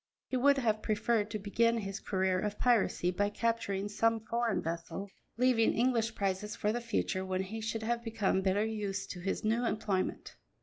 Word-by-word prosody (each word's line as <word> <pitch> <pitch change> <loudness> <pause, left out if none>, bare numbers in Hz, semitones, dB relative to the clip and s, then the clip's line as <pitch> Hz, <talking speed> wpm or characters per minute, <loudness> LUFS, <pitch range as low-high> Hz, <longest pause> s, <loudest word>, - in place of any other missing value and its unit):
He - - -1
would 280 +2 +4
have 220 -5 +1
preferred 215 0 +1
to 215 - -3
begin 230 +3 +2
his 195 -2 -4
career 190 -2 0
of 210 +1 -2
piracy 225 -7 +2
by 205 +3 +1
capturing 205 -3 -1
some 225 +2 +1
foreign 230 0 0
vessel, 170 +4 -4 0.3
leaving 245 -2 +3
English 235 -2 +1
prizes 200 +1 -2
for 210 - 0
the 240 - -2
future, 220 -4 -1
when 185 0 -1
he 220 +4 -6
should 220 0 -3
have 235 +1 -1
become 220 -4 0
better 195 +2 +2
used 205 -3 -3
to 180 - -7
his 195 +2 -2
new 225 +3 +1
employment. 210 -5 -1
215 Hz, 180 wpm, -32 LUFS, 195-230 Hz, 0.3 s, would